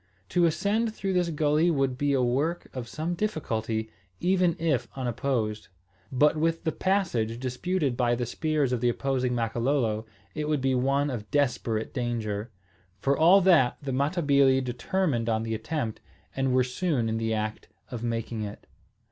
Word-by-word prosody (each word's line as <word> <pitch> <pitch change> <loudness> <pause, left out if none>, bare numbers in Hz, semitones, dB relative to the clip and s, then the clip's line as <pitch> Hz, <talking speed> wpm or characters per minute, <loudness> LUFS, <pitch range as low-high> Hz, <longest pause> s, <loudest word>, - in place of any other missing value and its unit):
To 175 -1 +3
ascend 215 +6 0
through 195 -1 -2
this 180 -2 +1
gulley 155 +1 +2
would 135 -5 +1
be 145 +2 0
a 130 -2 +2
work 145 +8 0
of 125 -2 -4
some 160 +7 -3
difficulty, 115 - -2 0.3
even 180 -1 +2
if 160 -7 0
unopposed. 120 -4 -2 0.4
But 145 +4 +4
with 165 +1 0
the 160 - 0
passage 155 - 0
disputed 130 +3 -1
by 120 -1 +2
the 120 0 -2
spears 150 +1 0
of 120 - -1
the 120 - +3
opposing 130 0 0
Makololo, 115 -1 0 0.3
it 150 0 -3
would 150 -2 +1
be 135 0 +1
one 135 +3 +1
of 105 -4 -6
desperate 125 -6 0
danger. 115 -4 -2 0.5
For 135 +6 +2
all 175 +6 +6
that, 170 -9 +4
the 140 -2 -4
Matabili 140 -2 +3
determined 125 0 -1
on 110 0 +1
the 115 0 -3
attempt, 115 0 -3 0.3
and 135 -1 +1
were 130 0 +4
soon 125 -1 -1
in 110 0 -1
the 110 0 0
act 110 0 -3 0.2
of 120 -2 -5
making 115 -1 -2
it. 105 -1 -7
130 Hz, 165 wpm, -27 LUFS, 115-155 Hz, 0.5 s, all